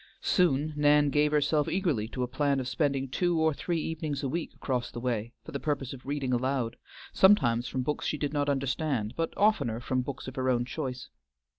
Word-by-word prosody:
Soon 155 Hz, -4 st, +2 dB
Nan 145 Hz, -1 st, +4 dB
gave 150 Hz, +1 st, +3 dB
herself 150 Hz, 0 st, +2 dB
eagerly 165 Hz, -, 0 dB
to 125 Hz, +2 st, -3 dB
a -, -, -1 dB
plan 140 Hz, +2 st, +1 dB
of 130 Hz, -, -3 dB
spending 135 Hz, -1 st, 0 dB
two 175 Hz, +5 st, 0 dB
or 160 Hz, -1 st, +3 dB
three 170 Hz, +3 st, -2 dB
evenings 155 Hz, -2 st, -3 dB
a -, -, 0 dB
week 165 Hz, +5 st, -3 dB
across 125 Hz, -3 st, -2 dB
the 120 Hz, -, -7 dB
way 120 Hz, -2 st, -2 dB
for -, -, -8 dB
the 140 Hz, -, -3 dB
purpose 140 Hz, -3 st, -2 dB
of 130 Hz, 0 st, -11 dB
reading 140 Hz, -3 st, -1 dB
aloud, 125 Hz, -1 st, 0 dB, 0.4 s
sometimes 125 Hz, -, +4 dB
from 130 Hz, 0 st, -2 dB
books 150 Hz, +3 st, -2 dB
she 150 Hz, -, -1 dB
did 145 Hz, 0 st, -2 dB
not 145 Hz, -1 st, +1 dB
understand, 135 Hz, -4 st, -1 dB
but 165 Hz, 0 st, -1 dB
oftener 200 Hz, -, +2 dB
from 130 Hz, +1 st, -1 dB
books 130 Hz, 0 st, -6 dB
of 130 Hz, +1 st, -8 dB
her 130 Hz, 0 st, +1 dB
own 120 Hz, -1 st, +2 dB
choice. 130 Hz, -2 st, -5 dB
140 Hz, 205 wpm, -29 LUFS, 125-150 Hz, 0.4 s, Nan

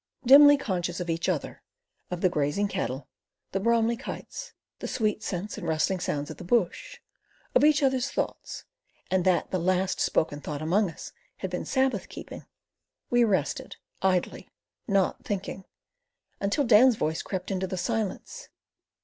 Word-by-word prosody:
Dimly 290 Hz, +3 st, +9 dB
conscious 180 Hz, -8 st, -2 dB
of 175 Hz, -1 st, -2 dB
each 165 Hz, 0 st, -1 dB
other, -, -, -3 dB, 0.5 s
of 180 Hz, -1 st, -4 dB
the 185 Hz, -, +4 dB
grazing 150 Hz, +6 st, 0 dB
cattle 145 Hz, -9 st, -3 dB, 0.4 s
the 195 Hz, -, -1 dB
Bromli 230 Hz, +2 st, +2 dB
kites, 255 Hz, -, -7 dB, 0.3 s
the -, -, -4 dB
sweet 215 Hz, -2 st, -1 dB
scents 190 Hz, +2 st, -4 dB
and 170 Hz, -, -6 dB
rustling 160 Hz, +4 st, +1 dB
sounds 145 Hz, -4 st, -3 dB
of -, -, -9 dB
the -, -, -9 dB
bush, 180 Hz, -1 st, 0 dB, 0.6 s
of -, -, +4 dB
each 300 Hz, 0 st, +5 dB
other's 260 Hz, -2 st, +2 dB
thoughts -, -, -4 dB, 0.5 s
and 185 Hz, -1 st, +2 dB
that 180 Hz, -2 st, +2 dB
the 185 Hz, -, 0 dB
last 185 Hz, +2 st, 0 dB
spoken 145 Hz, -2 st, 0 dB
thought 145 Hz, -1 st, -5 dB
among 180 Hz, +6 st, +1 dB
us 165 Hz, -, -9 dB, 0.3 s
had -, -, -5 dB
been -, -, -3 dB
Sabbath 260 Hz, -8 st, 0 dB
keeping, -, -, -9 dB, 0.6 s
we 240 Hz, 0 st, +5 dB
rested, 205 Hz, -5 st, -1 dB, 0.3 s
idly, 185 Hz, -2 st, 0 dB, 0.4 s
NOT 195 Hz, -3 st, +1 dB
thinking, 195 Hz, -1 st, -4 dB, 0.7 s
until 200 Hz, +9 st, +1 dB
Dan's 240 Hz, +1 st, +6 dB
voice 160 Hz, -6 st, -1 dB
crept 190 Hz, 0 st, -5 dB
into 190 Hz, 0 st, -1 dB
the 185 Hz, -, -4 dB
silence. 225 Hz, -, -3 dB
190 Hz, 155 wpm, -27 LUFS, 175-230 Hz, 0.7 s, Dimly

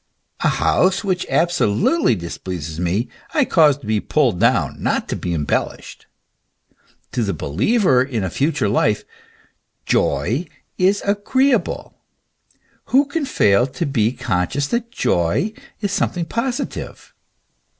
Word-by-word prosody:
A -, -, +1 dB
house 190 Hz, +3 st, +2 dB
which 185 Hz, -3 st, -1 dB
abso 175 Hz, -4 st, +2 dB
lutely 325 Hz, -, +3 dB
displeases 85 Hz, -3 st, -6 dB
me 90 Hz, +7 st, 0 dB, 0.3 s
I 295 Hz, -4 st, +4 dB
cause 150 Hz, -, +4 dB
to 140 Hz, -, -14 dB
be 110 Hz, 0 st, +1 dB
pulled 125 Hz, -, +1 dB
down, -, -, +1 dB
not -, -, 0 dB
to -, -, -1 dB
be 90 Hz, -, -4 dB
embellished. 75 Hz, -3 st, -3 dB, 1.0 s
To 125 Hz, -, -1 dB
the 100 Hz, -5 st, -1 dB
believer 125 Hz, -, +2 dB
in 125 Hz, -6 st, -2 dB
a 95 Hz, -, -3 dB
future 140 Hz, -, 0 dB
life 105 Hz, 0 st, +1 dB, 0.8 s
joy 110 Hz, -, 0 dB, 0.3 s
is 195 Hz, +2 st, +2 dB
agreeable 255 Hz, +7 st, 0 dB, 0.9 s
who 275 Hz, +3 st, +3 dB
can 285 Hz, +1 st, -2 dB
fail 105 Hz, -, +3 dB
to 140 Hz, +6 st, -3 dB
be 120 Hz, -6 st, +1 dB
conscious 90 Hz, +4 st, -1 dB
that 235 Hz, 0 st, -1 dB
joy 90 Hz, -, 0 dB, 0.3 s
is 205 Hz, -2 st, -1 dB
something 180 Hz, -3 st, -1 dB
positive? 250 Hz, -, -4 dB
140 Hz, 130 wpm, -20 LUFS, -, 1.0 s, I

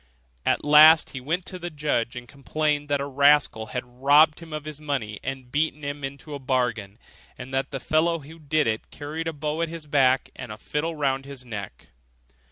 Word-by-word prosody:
At -, -, +1 dB
last 155 Hz, +2 st, +7 dB
he 135 Hz, -, -6 dB
went 165 Hz, +7 st, -2 dB
to 185 Hz, -, -6 dB
the 175 Hz, 0 st, -5 dB
judge, 145 Hz, -6 st, -1 dB
and 120 Hz, 0 st, -8 dB
complained 145 Hz, +2 st, -2 dB
that 145 Hz, -1 st, +1 dB
a 140 Hz, -, -2 dB
rascal 140 Hz, -5 st, +3 dB
had 125 Hz, +3 st, -4 dB, 0.2 s
robbed 150 Hz, +3 st, +5 dB
him 165 Hz, -1 st, -12 dB
of 155 Hz, -1 st, -5 dB
his 155 Hz, -1 st, -7 dB
money, 130 Hz, -9 st, -3 dB
and 130 Hz, -2 st, -6 dB
beaten 150 Hz, +1 st, 0 dB
him 145 Hz, 0 st, -5 dB
into 140 Hz, +3 st, -7 dB
the 145 Hz, -, -5 dB
bargain; 125 Hz, -6 st, -1 dB, 0.4 s
and 130 Hz, +1 st, -9 dB
that 135 Hz, 0 st, 0 dB
the 135 Hz, -, -4 dB
fellow 165 Hz, +5 st, +1 dB
who 160 Hz, +2 st, -13 dB
did 155 Hz, 0 st, +1 dB
it 110 Hz, -1 st, -2 dB
carried 155 Hz, +3 st, -5 dB
a -, -, 0 dB
bow 150 Hz, +1 st, -3 dB
at 165 Hz, -, 0 dB
his 165 Hz, -2 st, -8 dB
back 135 Hz, -3 st, +2 dB
and 125 Hz, -3 st, -8 dB
a 105 Hz, -, -7 dB
fiddle 150 Hz, +8 st, -3 dB
hung -, -, -11 dB
round 135 Hz, -1 st, 0 dB
his 135 Hz, -2 st, -8 dB
neck. 100 Hz, -, -8 dB
145 Hz, 210 wpm, -25 LUFS, 130-155 Hz, 0.4 s, last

